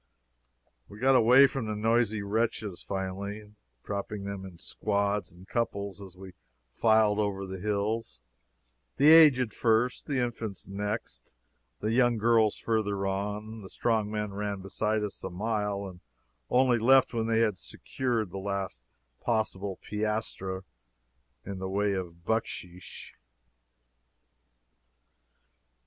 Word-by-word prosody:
We 100 - -11
got 130 +4 +4
away 125 +2 +7
from 135 -4 -2
the 110 - -2
noisy 110 -1 +1
wretches, 105 -2 -1
finally, 100 +2 -5 0.3
dropping 100 0 -4
them 100 -1 -5
in 90 -2 -13
squads 100 +2 -1
and 90 +3 -16
couples 100 -4 -2
as 95 -2 -11
we 95 -1 -11 0.4
filed 110 - +3
over 100 -2 -1
the 95 0 -6
hills 105 +3 -2 0.8
the 145 +2 +6
aged 135 -9 +7
first, 115 +2 +1
the 140 - -1
infants 115 -5 -4
next, 100 - -5 0.5
the 110 - 0
young 120 0 +3
girls 110 -1 +3
further 100 -3 -1
on; 105 +3 -3
the 95 - -10
strong 110 -3 0
men 105 -1 -3
ran 100 -1 -3
beside 105 +2 -1
us 105 - -6
a 95 - -3
mile, 105 +1 -2
and 90 -2 -11 0.5
only 125 -1 +4
left 130 +3 +5
when 115 -1 -1
they 115 0 +2
had 105 -5 +1
secured 115 -4 -3
the 95 - -5
last 95 -9 -4 0.4
possible 100 -4 -1
piastre 105 -3 -2 0.8
in 100 -1 -6
the 95 0 -4
way 100 +1 +1
of 85 -3 -6
bucksheesh. 90 -5 -4
105 Hz, 130 wpm, -29 LUFS, 100-115 Hz, 0.8 s, away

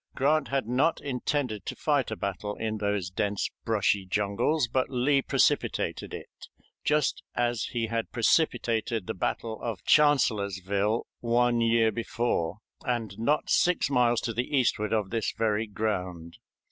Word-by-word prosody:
Grant 145 +2 +2
had 135 -4 -1
not 135 +7 +2
intended 125 -5 -2
to - - -3
fight - - +1
a - - -3
battle 105 0 -4
in 110 -1 -3
those 100 -4 -1
dense, 100 0 -1
brushy 105 -3 +2
jungles, 105 - +1
but 130 +2 0
Lee 135 +2 +2
precipitated - - 0
it - - -10 0.4
just 150 -1 +1
as 120 -2 0
he 115 -2 -2
had 115 0 -3
precipitated 115 - +1
the - - -3
battle 110 +4 -3
of 115 -6 -4
Chancellorsville 105 - +2
one 120 0 +2
year 115 -1 +3
before, 115 -5 -2 0.2
and 115 -5 -2
not 145 +7 +1
six 180 -5 +3
miles 120 -3 +3
to 115 - -2
the 125 +5 -1
eastward 105 -4 +1
of 105 -4 0
this 115 -2 -1
very 110 0 +1
ground. 90 -6 -3
115 Hz, 145 wpm, -28 LUFS, 105-125 Hz, 0.4 s, year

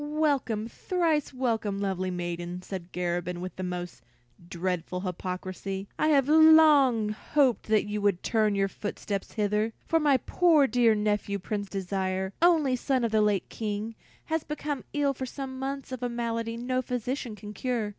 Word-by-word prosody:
"Welcome, 285 -8 0
thrice 325 +2 0
welcome, 225 -6 -1
lovely 190 -2 -1
maiden," 175 0 -4
said 185 -2 -7
Garabin 175 0 -2
with 185 +1 -6
the - - -6
most 180 -5 -5 0.5
dreadful 180 0 -2
hypocrisy. 185 +1 -4
"I - - +3
have 280 -4 +4
long 300 -7 +6
hoped 255 +4 +1
that 215 -1 +3
you 210 0 -3
would 200 -3 +1
turn 215 -3 +2
your 195 0 +2
footsteps 200 0 -5
hither, 210 +1 0
for 325 - +2
my 290 -3 +4
poor 320 +1 +3
dear 240 -4 +3
nephew, 210 -1 0
Prince 200 +1 -4
Desire, 190 0 -2
only 320 -7 +4
son 255 0 0
of 230 - 0
the 220 -1 +3
late 205 -3 +1
King, 215 0 -4 0.3
has 320 -1 -1
been 295 -2 -4
ill 285 -1 +1
for 260 0 -5
some 260 0 -6
months 275 0 -4
of 255 -1 -5
a 245 - -1
malady 230 -1 -2
no 255 +2 -1
physician 250 -1 -3
can 210 +1 -9
cure. 235 -1 -2
220 Hz, 165 wpm, -28 LUFS, 195-265 Hz, 0.5 s, long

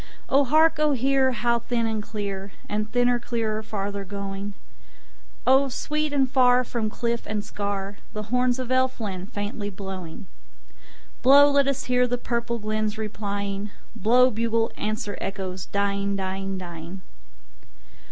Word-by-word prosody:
O 275 +1 +5
hark, 315 +3 +4
O 305 -1 +3
hear! 265 +1 +3
how 235 0 +1
thin 235 0 -1
and 220 -1 -1
clear, 200 -2 -5
And 210 +1 -2
thinner, 245 0 +3
clearer, 225 -2 -2
farther 200 -2 -4
going!O 200 +6 -3
sweet 300 +4 -2
and 275 -2 +3
far 255 -1 +4
from 230 -3 -2
cliff 235 +1 -2
and 210 -1 -2
scarThe 200 +1 -5
horns 250 0 +2
of 255 -2 -4
Elfland 225 -8 0
faintly 205 0 -3
blowing! 190 -3 -7 1.0
Blow, 285 +3 +8
let 280 -1 +4
us 275 0 0
hear 250 0 +2
the 245 0 0
purple 235 -1 -2
glens 215 0 -2
replying:Blow, 210 +3 0
bugle; 230 +1 +1
answer, 210 -1 -3
echoes, 190 -1 -4
dying, 200 0 0
dying, 195 0 -3
dying. 175 0 -8
215 Hz, 130 wpm, -25 LUFS, 200-250 Hz, 1.0 s, Blow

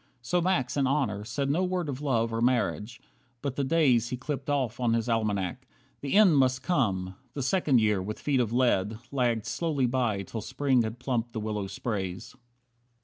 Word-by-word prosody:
So 175 +8 +1
Max, 170 -9 0
in 135 -2 +2
honour, 130 -8 0
said 140 +4 -1
No 175 +6 +1
word 180 -2 -1
of 140 -1 -4
love 115 -5 0
or 115 - -1
marriage; 120 -2 0 0.4
but 140 -2 -2
the 140 - 0
days 130 -6 +3
He 125 - -3
clipped 135 +1 -4
off 130 -5 0
on 120 -2 +2
his 115 0 -1
almanac. 110 0 -1 0.3
The 140 - -4
end 195 -8 +6
Must 130 0 +2
come! 95 - 0 0.2
The 140 - -2
second 140 -3 +3
year, 105 -3 +2
with 105 +3 -5
feet 140 -3 +1
of 115 -3 0
lead, 115 -4 +1
Lagged 120 -5 0
slowly 145 +1 0
by 120 -5 0
till 110 +3 -6
Spring 130 +2 +1
had 110 +1 -3
plumped 120 -2 -2
the 110 - -3
willow 105 -2 -3
sprays. 95 -4 -4
125 Hz, 190 wpm, -28 LUFS, 110-140 Hz, 0.4 s, end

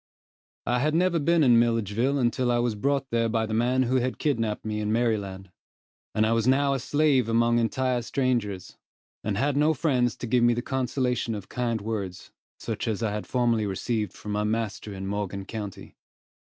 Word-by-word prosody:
I 125 +1 +1
had 150 +4 +1
never 175 0 +2
been 165 +2 +3
in 120 -3 +6
Milledgeville 115 +3 +1
until 125 0 +1
I 120 - +2
was 120 -1 +1
brought 135 +5 -1
there 115 -1 +1
by 110 0 0
the 110 - -4
man 125 +3 +2
who 130 +1 +1
had 130 0 -1
kidnapped 115 -9 -1
me 105 -1 -2
in 105 0 -1
Maryland, 100 -5 -1 0.6
and 110 - +3
I 110 - +1
was 115 0 +1
now 140 +1 +3
a 135 - -1
slave 140 -3 +2
among 115 +1 +3
entire 125 +2 0
strangers, 115 -6 -2 0.5
and 100 -2 -1
had 140 +4 +1
no 150 +2 +3
friend 130 -5 +2
to 120 - -7
give 120 +1 +2
me 120 0 +4
the 120 - -3
consolation 125 -3 -1
of 100 -2 -8
kind 120 -3 -1
words, 100 -4 -5 0.3
such - - -4
as 110 0 -1
I 110 - 0
had 105 0 -4
formerly 120 -4 +1
received 105 +1 -2
from 105 - -7
my 105 0 0
master 110 -1 -2
in 95 -1 -6
Morgan 100 -1 -3
county. 105 -2 -7
115 Hz, 190 wpm, -26 LUFS, 105-130 Hz, 0.6 s, in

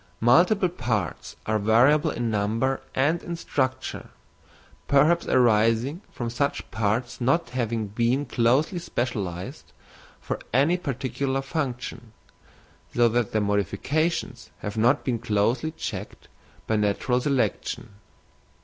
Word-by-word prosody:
Multiple 180 - +4
parts 110 - -3
are 110 0 +1
variable 120 +8 +4
in 120 -1 -2
number 110 +6 0
and 155 +6 +2
in 170 - -5
structure, 130 -5 -2 0.8
perhaps 150 +5 +4
arising 120 - +3
from 120 -1 -4
such 140 +4 -2
parts 115 +4 -1
not 135 +4 +1
having 115 -3 -1
been 120 +7 0
closely 135 +10 +2
specialised 100 - -4 0.5
for - - -4
any 140 +8 +3
particular 135 -2 -2
function, 125 -5 -4 0.8
so 120 0 +5
that 120 -1 0
their 110 - +1
modifications 120 - -1
have 105 0 -4
not 120 +6 +3
been 120 -3 0
closely 115 +6 +1
checked 160 - -7 0.4
by 110 - +1
natural 105 +5 +1
selection. 135 -1 -1
120 Hz, 115 wpm, -25 LUFS, 110-140 Hz, 0.8 s, so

